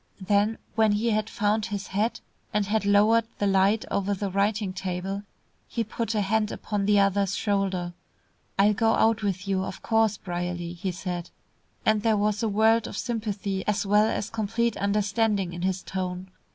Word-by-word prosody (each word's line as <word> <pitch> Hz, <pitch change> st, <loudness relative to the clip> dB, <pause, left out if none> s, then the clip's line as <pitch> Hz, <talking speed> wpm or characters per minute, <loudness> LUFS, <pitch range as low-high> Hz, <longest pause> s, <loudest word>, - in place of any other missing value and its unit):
Then 205 Hz, +3 st, +1 dB, 0.2 s
when 220 Hz, -2 st, +3 dB
he 225 Hz, +3 st, +1 dB
had 215 Hz, +1 st, 0 dB
found 210 Hz, 0 st, 0 dB
his 205 Hz, -1 st, -4 dB
hat, 210 Hz, +4 st, -1 dB, 0.3 s
and 210 Hz, 0 st, +1 dB
had 210 Hz, +1 st, 0 dB
lowered 210 Hz, +3 st, +5 dB
the 205 Hz, -, 0 dB
light 195 Hz, +2 st, +3 dB
over 200 Hz, 0 st, 0 dB
the 195 Hz, 0 st, -3 dB
writing 200 Hz, 0 st, 0 dB
table, 190 Hz, +1 st, -3 dB, 0.5 s
he 230 Hz, -, -2 dB
put 225 Hz, +1 st, -3 dB
a 210 Hz, -, +2 dB
hand 215 Hz, +2 st, +1 dB
upon 205 Hz, -2 st, -2 dB
the 205 Hz, -1 st, +5 dB
other's 200 Hz, -1 st, +2 dB
shoulder. 190 Hz, -4 st, -1 dB, 0.6 s
"I'll 205 Hz, +2 st, +5 dB
go 225 Hz, +2 st, +2 dB
out 225 Hz, 0 st, +3 dB
with 195 Hz, -1 st, -2 dB
you, 190 Hz, -1 st, +1 dB
of -, -, -7 dB
course, 225 Hz, -2 st, +2 dB
Brierly," 175 Hz, -1 st, -4 dB
he 185 Hz, +2 st, -3 dB
said, 180 Hz, -1 st, -5 dB, 0.6 s
and 215 Hz, -1 st, +3 dB
there 220 Hz, 0 st, +2 dB
was 210 Hz, 0 st, +1 dB
a 225 Hz, -, +1 dB
world 220 Hz, +2 st, +3 dB
of -, -, -7 dB
sympathy, 205 Hz, -5 st, -2 dB
as 210 Hz, 0 st, +1 dB
well 210 Hz, +2 st, +4 dB
as 210 Hz, -, -3 dB
complete 225 Hz, +1 st, 0 dB
understanding 200 Hz, -1 st, 0 dB
in 175 Hz, -, -6 dB
his 185 Hz, 0 st, -1 dB
tone. 185 Hz, 0 st, -4 dB
205 Hz, 180 wpm, -26 LUFS, 190-215 Hz, 0.6 s, lowered